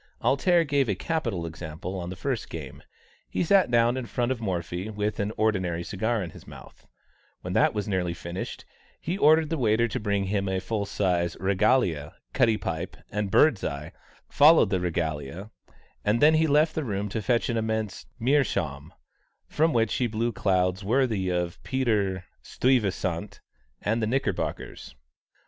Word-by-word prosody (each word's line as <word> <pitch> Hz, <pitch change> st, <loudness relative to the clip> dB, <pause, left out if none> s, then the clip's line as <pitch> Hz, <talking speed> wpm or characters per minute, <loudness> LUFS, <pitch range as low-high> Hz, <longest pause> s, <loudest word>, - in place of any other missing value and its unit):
"Alter" 170 Hz, +5 st, +3 dB
gave 140 Hz, -5 st, +1 dB
a 100 Hz, -, +1 dB
capital 115 Hz, -, -2 dB
example 80 Hz, +2 st, -6 dB
on 90 Hz, 0 st, -5 dB
the 95 Hz, -, -6 dB
first 125 Hz, +5 st, -3 dB
game: 75 Hz, -6 st, -8 dB, 0.5 s
he -, -, -1 dB
sat 190 Hz, -1 st, +4 dB
down 120 Hz, 0 st, +3 dB
in 125 Hz, -2 st, -4 dB
front 120 Hz, +1 st, -1 dB
of 125 Hz, -3 st, -3 dB
Morphy 90 Hz, -1 st, -3 dB
with 105 Hz, 0 st, -2 dB
an 100 Hz, +1 st, -1 dB
ordinary 95 Hz, -6 st, 0 dB
cigar 110 Hz, +3 st, -1 dB
in 85 Hz, -, -7 dB
his -, -, -14 dB
mouth; -, -, -14 dB, 0.5 s
when -, -, -5 dB
that -, -, +3 dB
was 105 Hz, 0 st, -2 dB
nearly 90 Hz, -4 st, -1 dB
finished, 85 Hz, +3 st, -6 dB, 0.3 s
he 175 Hz, -, -3 dB
ordered 160 Hz, -3 st, +4 dB
the 165 Hz, -, -1 dB
waiter 115 Hz, -1 st, +3 dB
to 110 Hz, -, -3 dB
bring 100 Hz, -2 st, 0 dB
him 100 Hz, 0 st, -1 dB
a 95 Hz, 0 st, 0 dB
full 105 Hz, +1 st, -3 dB
sized 90 Hz, -4 st, 0 dB
regalia; 95 Hz, -, +1 dB, 0.2 s
cutty 115 Hz, -5 st, +3 dB
pipe 100 Hz, -, -4 dB
and 105 Hz, -1 st, -2 dB
"birdseye" 95 Hz, -, +2 dB, 0.4 s
followed 150 Hz, -, +6 dB
the 95 Hz, -, +2 dB
regalia; 85 Hz, +2 st, -3 dB, 0.5 s
and 105 Hz, +3 st, +2 dB
then 150 Hz, +4 st, +6 dB
he 160 Hz, 0 st, +3 dB
left 150 Hz, +2 st, +3 dB
the 160 Hz, -, -2 dB
room 105 Hz, -4 st, -2 dB
to 110 Hz, +2 st, -3 dB
fetch 120 Hz, +2 st, +1 dB
an 120 Hz, -, -1 dB
immense 110 Hz, -2 st, -2 dB
meerschaum, 100 Hz, -, 0 dB, 0.6 s
from 160 Hz, +2 st, +2 dB
which 115 Hz, -4 st, +1 dB
he 125 Hz, -, +1 dB
blew 115 Hz, +2 st, -1 dB
clouds 95 Hz, -2 st, 0 dB
worthy 110 Hz, -4 st, +1 dB
of 90 Hz, +1 st, -2 dB
Peter 105 Hz, -8 st, 0 dB, 0.2 s
Stuyvesant 100 Hz, -9 st, 0 dB, 0.4 s
and 110 Hz, +3 st, 0 dB
the 110 Hz, -, 0 dB
Knickerbockers. 130 Hz, -, -3 dB
105 Hz, 160 wpm, -26 LUFS, 90-125 Hz, 0.6 s, followed